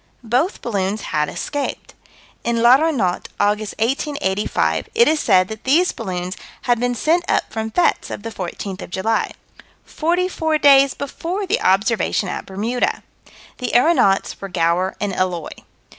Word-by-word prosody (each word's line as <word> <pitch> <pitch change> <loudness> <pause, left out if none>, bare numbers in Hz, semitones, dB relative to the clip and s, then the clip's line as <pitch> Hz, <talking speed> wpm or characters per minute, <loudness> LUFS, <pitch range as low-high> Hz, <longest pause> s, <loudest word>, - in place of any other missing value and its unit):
Both 250 - 0
balloons 205 -2 -1
had 150 0 +1
escaped. 290 -2 -4 0.5
In 235 0 0
L'Aéronaute, 250 - +3
August, 210 +1 0
1885, 230 -4 -1
it 470 +1 +5
is 310 0 +2
said 185 -7 +4
that 220 0 -8
these 330 +8 +3
balloons 185 -3 -4 0.3
had 240 -2 +2
been 245 0 0
sent 330 +8 +2
up - - 0
from 220 0 -3
fêtes 345 +10 +1
of - - -6
the 225 - -5
fourteenth 190 0 -6
of - - -8
July 220 +5 -1 0.5
44 335 -1 0
days 275 -2 +5
before 340 +8 -4
the 425 +6 0
observation 200 0 +1
at - - -5
Bermuda. 220 +6 -1 0.6
The 250 - -3
aeronauts 245 - +3
were 195 - -5
Gower 175 +2 0
and 205 -2 -2
Eloy. 180 -4 -2
225 Hz, 145 wpm, -20 LUFS, 195-290 Hz, 0.6 s, it